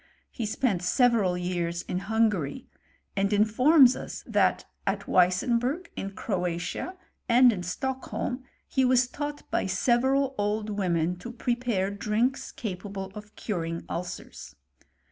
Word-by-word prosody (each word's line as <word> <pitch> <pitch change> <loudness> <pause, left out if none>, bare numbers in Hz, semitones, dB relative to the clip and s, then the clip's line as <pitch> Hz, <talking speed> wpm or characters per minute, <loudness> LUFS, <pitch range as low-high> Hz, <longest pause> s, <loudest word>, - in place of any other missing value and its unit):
* - - -40
He 225 - -3
spent 210 -4 0
several 210 -2 +3
years 175 -1 -2
in 180 - -3
Hungary; 215 - 0 0.5
and 195 +1 +1
informs 250 +6 +6
us - - -7
that - - +2 0.2
at - - -1
Weissenburg, 240 - +2
in 195 - -4
Cjcpatia, 180 - -3 0.3
and 245 0 +7
in 185 - -4
Stockholm, 255 +6 -3 0.2
he 265 - +1
was 250 -1 +4
taught 290 +2 -5
by - - +1
several 265 +2 +2
pld 210 +1 -1
women 180 -4 0
to 205 +7 -8
prepare 240 -5 -1
drinks 220 +6 -1
capable 195 -2 -5
of 210 +1 -11
curing 170 -5 -3
ulcere. 170 - -6
210 Hz, 125 wpm, -27 LUFS, 180-250 Hz, 0.5 s, and